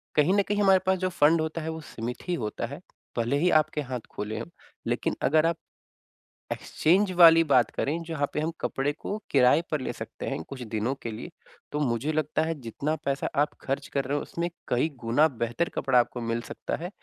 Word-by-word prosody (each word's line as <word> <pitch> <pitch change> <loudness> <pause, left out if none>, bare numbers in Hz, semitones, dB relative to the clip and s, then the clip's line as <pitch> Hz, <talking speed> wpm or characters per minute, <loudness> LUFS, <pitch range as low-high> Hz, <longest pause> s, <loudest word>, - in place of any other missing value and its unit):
कहीं 150 +5 +4
न 205 - +5
कहीं 205 0 +1
हमारे 190 -1 +6
पास 190 0 +3
जो 185 - 0
फंड 160 +2 +6
होता 160 +1 -3
है 160 - -4
वो 160 0 -5
सीमित 120 +7 -5
ही 180 - 0
होता 110 -4 -3
है, 140 +7 -8 0.4
भले 120 +4 +1
ही 180 +4 +3
आपके 150 0 -4
हाथ 130 -3 -4
खुले 110 +1 -4
हों, 115 - -5 0.4
लेकिन - - 0
अगर 155 +3 +4
आप 165 0 +1 0.9
एक्सचेंज 185 +5 +2
वाली 165 -1 +9
बात 125 -3 +5
करें 160 +4 -1
जहाँ 160 -4 -1
पे - - -1
हम 155 +2 -1
कपड़े 135 +2 0
को 200 +7 -5
किराए 135 +3 +5
पर 150 -3 0
ले - - -2
सकते - - -7
हैं - - -3
कुछ 135 -2 -8
दिनों 115 +2 -1
के 115 - -3
लिए। 110 +10 -7 0.4
तो 150 - -2
मुझे 135 +1 0
लगता 155 0 0
है 165 0 -1
जितना 140 +6 -2
पैसा 135 0 0
आप 150 - 0
खर्च 135 +1 -3
कर 140 - +1
रहे 140 +2 -1
हो 145 - 0
उसमें 170 +1 -3 0.2
कई 125 +6 +1
गुना 125 +7 +4 0.2
बेहतर 120 +9 -1
कपड़ा 130 -2 +3
आपको 120 0 -1
मिल 115 0 -1
सकता - - -3
है 175 - -3
145 Hz, 215 wpm, -27 LUFS, 125-165 Hz, 0.9 s, वाली